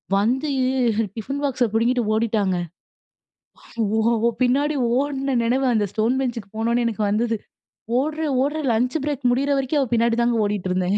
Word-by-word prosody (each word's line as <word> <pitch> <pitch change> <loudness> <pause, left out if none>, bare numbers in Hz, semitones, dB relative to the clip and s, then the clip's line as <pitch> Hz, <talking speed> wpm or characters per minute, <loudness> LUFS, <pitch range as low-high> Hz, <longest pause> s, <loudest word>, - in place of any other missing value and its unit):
வந்து 245 +9 +1 0.7
டிஃபின் 275 +6 -4
பாக்ஸ 265 -3 0
பிடுங்கிட்டு 235 +3 +1
ஓடிட்டாங்க. 215 -4 +1 1.4
ஓ! - - +2 0.2
அவ 230 +1 +2
பின்னாடி 280 +5 +2 0.2
ஓடின 275 -1 -1
நினைவு 260 +3 +1
அந்த 215 -3 +1
ஸ்டோன் 225 +4 +1
பெஞ்ச்க்கு 235 -6 -3
போனோனே 235 +2 +1
எனக்கு 220 -2 -2
வந்தது. 225 +3 0 0.6
ஓடுறேன், 305 +1 -1
ஓடுறேன் 295 +1 -1
லஞ்ச் 245 +4 0
பிரேக் 290 -2 -3
முடியிற 275 +3 +1
வரைக்கும், 270 +2 0
அவ 265 - -2
பின்னாடி 230 0 +2
தாங்க 235 0 +2
ஓடிட்டு 205 -3 -2
இருந்தேன். 185 +2 +1
240 Hz, 150 wpm, -22 LUFS, 220-275 Hz, 1.4 s, ஓ